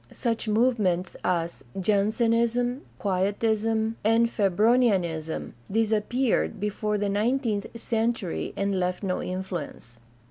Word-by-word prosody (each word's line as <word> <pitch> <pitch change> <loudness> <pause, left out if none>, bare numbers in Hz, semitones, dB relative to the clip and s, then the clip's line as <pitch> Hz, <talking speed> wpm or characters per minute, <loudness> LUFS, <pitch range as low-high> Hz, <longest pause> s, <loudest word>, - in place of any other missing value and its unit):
Such 230 -2 -2
movements 210 -6 +1
as 170 -2 -1 0.2
Jansenism, 230 +5 +1 0.2
Quietism, 220 +3 0
and 225 +2 +4
Febronianism 195 -6 +1 0.2
disappeared 225 +2 +1
before 210 +1 -1
the 205 0 0
nineteenth 215 +1 0
century 225 -5 -1
and 200 -1 0
left 180 +2 -1
no 185 -2 -1
influence. 175 -10 -5
210 Hz, 95 wpm, -26 LUFS, 190-230 Hz, 0.2 s, and